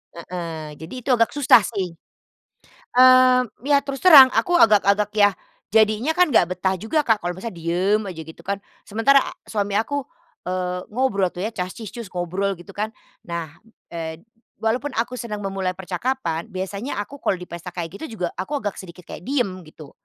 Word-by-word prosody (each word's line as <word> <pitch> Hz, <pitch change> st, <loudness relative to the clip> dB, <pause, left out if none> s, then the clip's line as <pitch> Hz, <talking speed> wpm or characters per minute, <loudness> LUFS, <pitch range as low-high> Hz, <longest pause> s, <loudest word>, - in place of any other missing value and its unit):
heeh, 165 Hz, -3 st, -6 dB
jadi 160 Hz, +7 st, -9 dB
itu -, -, -6 dB
agak 230 Hz, +2 st, +2 dB
susah 280 Hz, -5 st, +6 dB
sih. 190 Hz, -6 st, -3 dB, 1.0 s
Eee, 255 Hz, 0 st, +7 dB, 0.2 s
ya 285 Hz, -1 st, +4 dB
terus 275 Hz, +2 st, -7 dB
terang 280 Hz, -7 st, +10 dB
aku 355 Hz, +7 st, 0 dB
agak-agak 205 Hz, -1 st, +4 dB
yah 205 Hz, -1 st, +5 dB, 0.4 s
jadinya 220 Hz, +6 st, +3 dB
kan 360 Hz, 0 st, +3 dB
enggak 185 Hz, -9 st, +3 dB
betah 190 Hz, +1 st, -1 dB
juga, 225 Hz, -, 0 dB
Kak, 225 Hz, -9 st, +1 dB
kalau 175 Hz, -, -1 dB
misalnya 190 Hz, +1 st, -7 dB
diem 180 Hz, +5 st, +1 dB
aja 180 Hz, -4 st, -7 dB
gitu 160 Hz, 0 st, -12 dB
kan. 200 Hz, 0 st, -2 dB, 0.2 s
Sementara 245 Hz, +6 st, +3 dB, 0.2 s
suami 205 Hz, -2 st, -2 dB
aku, 255 Hz, +7 st, -1 dB, 0.4 s
eee, 180 Hz, 0 st, -3 dB
ngobrol 200 Hz, -7 st, +1 dB
tuh 175 Hz, -, -8 dB
ya, 210 Hz, -, -1 dB
cas-cis-cus, 205 Hz, +3 st, -6 dB
ngobrol 185 Hz, +3 st, -1 dB
gitu 195 Hz, +3 st, -13 dB
kan. 215 Hz, +2 st, -2 dB, 0.3 s
Nah, 170 Hz, -2 st, -4 dB, 0.4 s
eee, 165 Hz, -1 st, -6 dB, 0.4 s
walaupun 250 Hz, +6 st, -1 dB
aku 240 Hz, +3 st, -2 dB
senang 215 Hz, -4 st, -5 dB
memulai 195 Hz, -2 st, -2 dB
percakapan, 190 Hz, -2 st, -3 dB
biasanya 200 Hz, +6 st, -4 dB
aku 270 Hz, +8 st, -7 dB
kalau 190 Hz, -9 st, -1 dB
di 180 Hz, -, -9 dB
pesta 170 Hz, +1 st, -8 dB
kayak 165 Hz, -2 st, -6 dB
gitu 230 Hz, -11 st, -9 dB
juga, 175 Hz, -, 0 dB
aku 280 Hz, +10 st, -3 dB
agak 205 Hz, -2 st, -3 dB
sedikit 180 Hz, -1 st, -11 dB
kayak 175 Hz, -, -9 dB
diem, 255 Hz, -6 st, +1 dB, 0.2 s
gitu. 155 Hz, -2 st, -13 dB
200 Hz, 170 wpm, -22 LUFS, 180-245 Hz, 1.0 s, terang